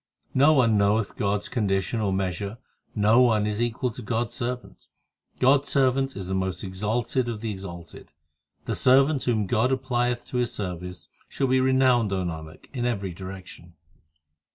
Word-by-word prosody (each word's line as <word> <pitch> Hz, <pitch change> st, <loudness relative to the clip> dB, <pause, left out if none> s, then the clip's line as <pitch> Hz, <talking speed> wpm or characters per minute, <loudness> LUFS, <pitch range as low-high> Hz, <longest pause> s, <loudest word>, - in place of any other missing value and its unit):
No 140 Hz, +4 st, +5 dB
one 115 Hz, -7 st, +4 dB
knoweth 100 Hz, +1 st, +1 dB
God 100 Hz, 0 st, 0 dB
s -, -, -7 dB
condition 100 Hz, -1 st, -1 dB
or 100 Hz, -2 st, 0 dB
measure 95 Hz, +2 st, -2 dB, 0.4 s
No 110 Hz, +3 st, +5 dB
one 110 Hz, -4 st, +3 dB
is 105 Hz, +1 st, -2 dB
equal 120 Hz, +1 st, -1 dB
to 120 Hz, -, -9 dB
God 115 Hz, +1 st, -1 dB
s -, -, -15 dB
servant; 125 Hz, 0 st, -5 dB, 0.5 s
God 135 Hz, +2 st, +4 dB
s 145 Hz, -, -8 dB
servant 135 Hz, 0 st, +1 dB
is 95 Hz, -2 st, -5 dB
the 95 Hz, -, -3 dB
most 95 Hz, 0 st, -2 dB
exalted 110 Hz, +6 st, -1 dB
of 110 Hz, -3 st, -5 dB
the 115 Hz, -1 st, -3 dB
exalted. 90 Hz, -4 st, -9 dB, 0.5 s
The -, -, -2 dB
servant 135 Hz, +2 st, +4 dB
whom 110 Hz, -4 st, +1 dB
God 115 Hz, +6 st, +1 dB
applieth 125 Hz, -2 st, -1 dB
to 125 Hz, -, -3 dB
His 120 Hz, -1 st, 0 dB
service, 90 Hz, -4 st, -6 dB, 0.2 s
Shall 135 Hz, -, -1 dB
be 130 Hz, 0 st, +3 dB
renowned, 130 Hz, -4 st, +3 dB
O 95 Hz, -1 st, 0 dB
Nanak, 80 Hz, -2 st, -7 dB
in 120 Hz, -2 st, -1 dB
every 100 Hz, -6 st, -2 dB
direction. 95 Hz, -2 st, -10 dB
110 Hz, 175 wpm, -25 LUFS, 95-125 Hz, 0.5 s, No